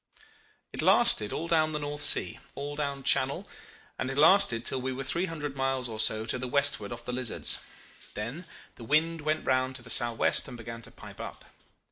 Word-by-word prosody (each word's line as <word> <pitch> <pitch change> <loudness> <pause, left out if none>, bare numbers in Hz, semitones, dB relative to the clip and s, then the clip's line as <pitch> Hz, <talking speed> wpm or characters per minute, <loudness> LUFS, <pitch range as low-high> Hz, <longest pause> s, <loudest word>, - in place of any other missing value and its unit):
"It - - -3
lasted 105 -1 +4
all 165 - -4
down 155 -2 +2
the - - -1
North 145 0 -5
Sea, - - +3 0.2
all 145 +1 -5
down 140 -2 -3
Channel; 135 0 0 0.5
and 130 - -2
it 135 - -5
lasted 155 - +5
till 130 - 0
we 130 +1 -3
were 130 +1 -5
three 170 +7 -1
hundred 150 -4 -5
miles 135 -2 -1
or 110 -2 -7
so 110 0 +2
to 120 +3 -3
the 125 - -4
westward 140 -6 +2
of 120 0 -8
the - - -4
Lizards: 125 -2 0 0.6
then 120 +12 -6 0.3
the 120 - -11
wind 160 +5 +1
went 155 +1 -1
round 130 0 0
to 125 - -5
the 115 - -5
sou'west 120 -2 +3
and 125 -2 -9
began 115 0 -8
to - - -8
pipe - - -12
up. - - -9
135 Hz, 200 wpm, -28 LUFS, 120-150 Hz, 0.6 s, lasted